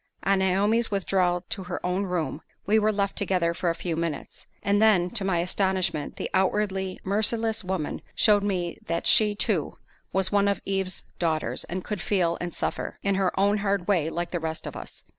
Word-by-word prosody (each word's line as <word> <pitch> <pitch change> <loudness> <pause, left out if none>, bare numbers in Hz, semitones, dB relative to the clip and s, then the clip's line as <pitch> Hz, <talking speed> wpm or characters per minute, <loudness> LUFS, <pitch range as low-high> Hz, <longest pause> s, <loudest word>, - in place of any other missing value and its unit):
On 195 0 +3
Naomi's 205 +5 +2
withdrawal 185 -3 +1
to 190 -3 -3
her 180 0 -4
own 185 +2 0
room, 165 -5 -2 0.2
we 215 +2 +4
were 215 0 +3
left 200 -1 -1
together 180 -4 +1
for 175 0 -1
a 165 - 0
few 170 -1 -3
minutes; 165 -2 -4 0.2
and 205 +1 +2
then, 190 -5 +4
to 220 -4 -1
my 190 -2 +1
astonishment, 185 -3 0
the - - -3
outwardly 190 -1 0
merciless 220 +2 0
woman 180 -4 -3
showed 210 -2 +5
me 185 -4 -2
that 170 0 -1
she, 210 -1 +5
too, - - -1 0.3
was 190 -1 0
one 200 -1 +3
of 200 - +1
Eve's 190 -2 -2 0.2
daughters, 160 -3 -1
and 185 +1 -4
could 210 -3 -4
feel 175 -4 +1
and 175 0 -3
suffer, - - -3
in 200 - +2
her 190 -1 0
own 205 +2 +3
hard 200 -3 0
way, 175 -6 +2
like 175 +1 -3
the 175 - -1
rest 160 0 -4
of - - -6
us. - - -9
190 Hz, 195 wpm, -26 LUFS, 175-200 Hz, 0.3 s, showed